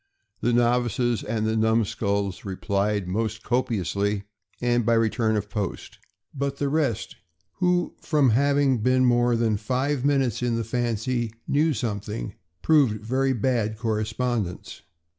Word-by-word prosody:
The 120 - +1
novices 120 0 +1
and 110 0 -2
the 110 0 0
numskulls 100 -3 0
replied 100 0 -1
most 110 +4 -2
copiously, 105 -4 -1 0.4
and 120 0 +1
by 115 +2 +3
return 115 0 +1
of 105 -1 -2
post; 105 -2 -5 0.3
but 140 -1 -2
the 140 0 -1
rest, 140 -7 -1 0.4
who, 180 -1 +1
from 145 -6 +3
having 140 +1 +3
been 130 +3 +3
more 120 -1 +3
than 115 -2 +1
five 130 +5 -1
minutes 135 -5 +1
in 120 -1 0
the 115 - -1
fancy, 120 0 -1 0.2
knew 150 +1 +2
something, 105 -1 -4 0.3
proved 125 -9 +3
very 135 +3 +1
bad 115 -3 0
correspondents. 110 -2 -2
115 Hz, 130 wpm, -25 LUFS, 110-130 Hz, 0.4 s, by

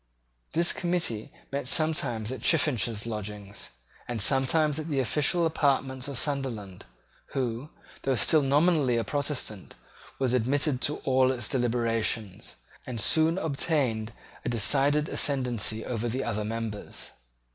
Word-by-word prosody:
This 170 +1 +2
committee 170 - -2 0.2
met 140 -2 -3
sometimes 130 -8 +1
at 130 - -6
Chiffinch's 120 - +2
lodgings, 105 -2 -6 0.4
and 120 -2 -3
sometimes 140 +6 +4
at 155 - -5
the 145 -4 -1
official 150 +6 +1
apartments 135 -4 0
of 140 -3 -3
Sunderland, 115 -10 -2 0.5
who, 125 +1 -2 0.3
though 135 -1 0
still 150 +7 +4
nominally 145 -2 +3
a 115 - 0
Protestant, 140 -5 -4 0.4
was 130 -2 0
admitted 130 +2 +1
to 150 - 0
all 130 0 +3
its 120 -3 -1
deliberations, 115 -5 -1 0.3
and 120 -3 -4
soon 160 - +3
obtained 135 - -1 0.3
a - - -2
decided 140 +7 +3
ascendency 120 -6 0
over 120 -1 -2
the 130 +4 -2
other 110 -2 -2
members. 110 -1 -5
130 Hz, 125 wpm, -28 LUFS, 115-145 Hz, 0.5 s, sometimes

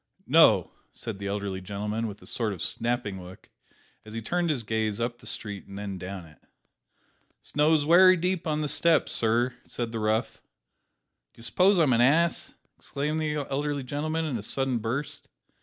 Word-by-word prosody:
"No!" - - +5 0.2
said 110 -4 -6
the 100 - -4
elderly 100 -1 -3
gentleman, 105 +4 -3
with 105 -1 -9
a - - -13
sort 110 -4 -2
of 90 - -8
snapping 115 -6 -2
look, 90 +1 -13 0.5
as 110 0 -10
he - - -2
turned 175 +7 0
his 135 -7 -1
gaze 110 -1 -1
up 120 0 -2
the - - -9
street 100 -3 -5
and 100 - -9
then 100 -2 -5
down 90 0 -7
it. 75 -1 -18 1.0
"Snow's 150 0 +2
wery 185 +3 +7
deep 180 0 -1
on 155 -1 0
the 150 - -1
steps, 165 +2 +3
sir," 120 +2 +2
said 120 -2 -4
the 115 - -3
rough. 110 +1 -1 0.9
"D'you 115 - -10
suppose 185 - +4
I'm 150 -7 +4
an 115 - +3
ass?" 165 +7 +3 0.3
exclaimed 150 +3 -3
the 150 -2 -1
elderly 145 0 -1
gentleman, 155 +5 -2
in 140 -6 -2
a - - -5
sudden 130 +3 -1
burst. 120 +7 -4
120 Hz, 175 wpm, -27 LUFS, 105-150 Hz, 1.0 s, wery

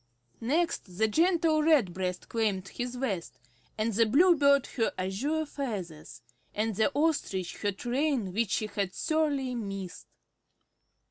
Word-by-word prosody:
Next 265 - -1
the 220 +2 +3
gentle 325 - +3
Redbreast 190 - +1
claimed 205 -4 -1
his 245 0 -4
vest, 210 -10 -3 0.4
and 220 +1 0
the 225 +2 +3
Bluebird 280 0 +5
her 230 -4 +1
azure 250 +13 -1
feathers, 200 - -6 0.3
and 215 0 -1
the 220 +7 +2
Ostrich 280 - 0
her 205 - -1
train 245 -1 -1
which 225 0 0
she 215 - 0
had 200 -3 -3
sorely 295 -5 0
missed. 195 -5 -6
230 Hz, 125 wpm, -29 LUFS, 195-290 Hz, 0.4 s, Bluebird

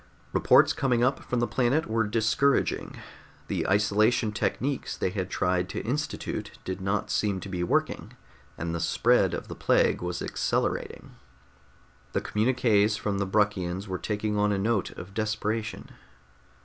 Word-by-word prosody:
Reports - - +5
coming 125 -3 +1
up 130 +2 +2
from 125 - -2
the - - +3
planet 130 +7 +1
were 115 -1 0
discouraging; 115 +6 +1 0.5
the - - -1
isolation 105 +3 +2
techniques 130 +6 -2
they 90 - -1
had 95 -2 -3
tried 90 0 0
to - - -4
institute 145 +6 -3
did 95 +1 -4
not 95 +2 -1
seem 100 -3 0
to 95 - -8
be 90 -2 -3
working, 85 - -1 0.4
and 85 +1 -3
the 85 - -2
spread 80 - +2
of - - -6
the - - -6
plague - - +2
was 90 0 -3
accelerating. - - -2 1.0
The - - 0
communiqués 110 -2 +2
from 100 -2 -2
the 100 - -1
Bruckians 95 -2 0
were 95 -2 -3
taking 105 +3 -2
on 105 0 +2
a 100 - +1
note 105 -1 0
of 95 +3 -10
desperation. 110 0 -2
105 Hz, 150 wpm, -27 LUFS, 95-115 Hz, 1.0 s, Reports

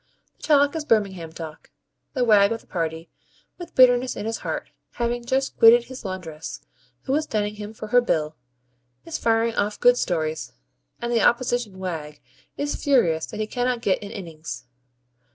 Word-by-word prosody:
The - - -28
talk 285 0 +3
is 320 - -2
Birmingham 195 - 0
talk. 160 -1 -9 0.5
The 255 - +2
wag 205 -2 +5
of 230 - -2
the - - -24
party, 165 -1 -4 0.5
with 350 - -9
bitterness 250 0 +5
in - - -5
his 225 0 -2
heart, - - -4 0.2
having 240 0 -2
just 265 +3 -1
quitted 235 +1 +8
his 260 +1 -10
laundress, 165 -6 -6 0.4
who 265 - -1
is 310 +2 +1
dunning 210 -1 -1
him 210 0 -6
for 215 -1 -8
her 245 +2 +5
bill, 155 -9 -1 0.7
is 330 -1 -4
firing 230 0 +2
off 210 -1 -1
good 245 0 +5
stories; 160 -6 -2 0.5
and 240 0 -2
the 230 - +3
opposition 240 -4 +1
wag 160 -5 -5 0.4
is 290 0 -3
furious 170 - +3
that 125 - -8
he 215 - 0
cannot 245 +1 -1
get 190 - +1
an 205 - -7
innings. 165 -6 -7
220 Hz, 170 wpm, -24 LUFS, 175-245 Hz, 0.7 s, quitted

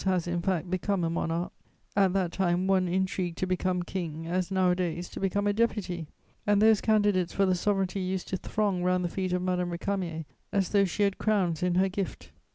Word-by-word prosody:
has, 185 -3 +1
in 175 0 -1
fact, 180 -1 0
become 185 +1 -1
a 165 - 0
monarch; 170 +1 -2 0.4
at 195 -2 +4
that 185 -3 0
time 180 -1 +1
one 190 -1 +3
intrigued 185 -1 -1
to - - 0
become 185 -1 0
king 165 -3 -4
as 180 +2 -1
nowadays 180 -2 +1
to - - -8
become 200 +1 0
a 205 - +2
deputy, 200 -7 -1 0.4
and 205 -1 +4
those 220 0 +5
candidates 205 -5 +2
for 195 - +3
the 185 - +3
sovereignty 195 0 0
used 185 0 -2
to - - -2
throng 200 -1 -1
round 180 0 +2
the - - -1
feet 185 0 -2
of 180 0 0
Madame 180 -1 0
Récamier 170 -2 -3 0.3
as 195 -4 +1
though 200 -1 +4
she 200 +3 -1
had 200 -1 +1
crowns 190 -7 +1
in 180 -1 +1
her 190 +2 +4
gift. 195 0 -5
185 Hz, 205 wpm, -28 LUFS, 175-195 Hz, 0.4 s, those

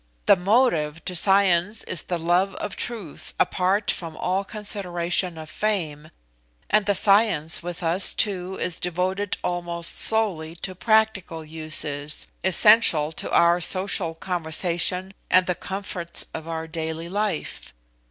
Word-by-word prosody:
The - - +6
motive 180 - +1
to 180 - -4
science 195 +2 +3
is 175 - -3
the 175 - -2
love 175 +4 0
of 195 - -6
truth 215 -11 -6
apart 190 +3 +1
from 165 -3 -7
all 185 +2 -1
consideration 180 -4 -2
of 155 -1 -9
fame, 155 -6 -3 0.6
and 210 -1 +2
science 195 -7 +3
with 175 +1 -7
us 170 +3 +3
too 190 -2 0
is 175 -2 -2
devoted 185 +3 -2
almost 175 -1 -2
solely 185 -8 +2
to 185 +2 -6
practical 200 -5 0
uses, 155 -2 -2 0.2
essential 190 -5 +4
to - - -5
our 170 +1 +3
social 185 -2 0
conversation 175 +2 -1 0.2
and 185 0 +4
the 180 - -1
comforts 185 -2 0
of 160 0 -7
our 160 -1 -4
daily 160 0 -5
life. 200 -2 -4
180 Hz, 130 wpm, -23 LUFS, 165-195 Hz, 0.6 s, The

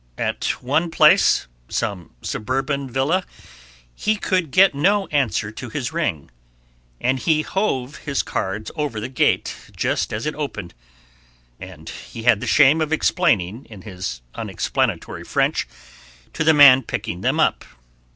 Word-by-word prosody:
At - - -2
one 155 +7 +1
place, 165 - +4 0.2
some 100 -6 -4
suburban 135 +4 -2
villa, 140 +9 0 0.7
he 215 - 0
could 185 -5 -1
get 185 +6 +5
no 195 +8 +2
answer 130 -7 0
to 120 +2 -8
his 135 +4 -4
ring, 80 - -2 0.7
and 130 +1 0
he 155 +2 +1
"hove" 150 -10 -2
his 140 -3 -2
cards 100 +3 -4
over 145 -8 -3
the 105 - -4
gate 130 - +1 0.2
just - - -1
as 105 +2 -4
it 150 - -1
opened, 110 - -6 0.9
and 90 -4 -11
he 115 - -9
had 115 -4 +4
the - - -4
shame 150 +2 +5
of 155 -1 -1
explaining 115 - +1
in 105 -4 -13
his 90 - -6
unexplanatory - - -2
French - - 0 0.7
to 160 - -1
the 160 - +5
man 135 -3 +8
picking 90 -6 -5
them - - 0
up. - - +2
135 Hz, 140 wpm, -21 LUFS, 105-155 Hz, 0.9 s, man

